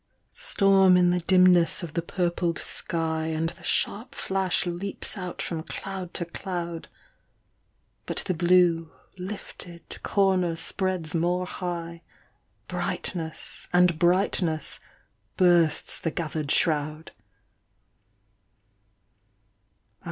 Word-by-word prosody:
Storm 195 -2 +4
in 175 -1 +4
the 180 - +1
dimness 180 -1 +4
of 165 -3 -6
the 170 - -1
purpled 175 -1 -1
sky, 160 -1 -2
And 160 0 -1
the 170 - -14
sharp 245 +6 -1
flash 190 -1 0
leaps 180 +3 -2
out 180 -3 -5
from 165 -2 -4
cloud 185 +1 -6
to 170 - -2
cloud: 170 -1 -5 1.2
But - - 0
the 185 - 0
blue, 175 -1 +3 0.3
lifted, 180 -3 -8
comer 190 -4 +1
spreads 180 -1 0
more 175 +2 0
high. 170 -2 -5 0.7
Brightness, 160 -4 -4
and 180 -2 +3
brightness, 175 -3 +1 0.6
bursts 175 -4 +5
the 165 - -1
gathered 155 -3 -4
shroud. 155 0 +1
175 Hz, 100 wpm, -26 LUFS, 165-185 Hz, 1.2 s, bursts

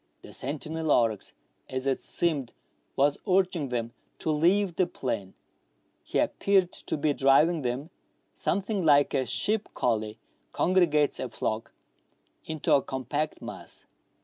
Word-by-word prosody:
The - - -9
sentinel 155 +3 -3
oryx, 110 -6 +2 0.4
as 130 0 -2
it 135 -1 0
seemed, 150 -8 -1 0.4
was 145 +1 +2
urging 180 -6 +2
them 120 -1 -3 0.2
to 160 - -1
leave 175 +4 +2
the 185 0 +2
plain; 105 - -4 0.7
he - - -3
appeared 190 -3 +2
to - - -2
be 150 0 +1
driving 150 +5 +4
them, 130 +6 -3 0.4
something 200 +1 -1
like 145 -2 +5
a 130 -3 +1
sheep 210 - 0
collie 110 -3 0 0.4
congregates 165 -5 +2
a 130 - -3
flock, 110 +1 -3 0.7
into 155 -2 -1
a 140 - +5
compact 140 +4 -3
mass. - - -9
145 Hz, 130 wpm, -28 LUFS, 130-170 Hz, 0.7 s, like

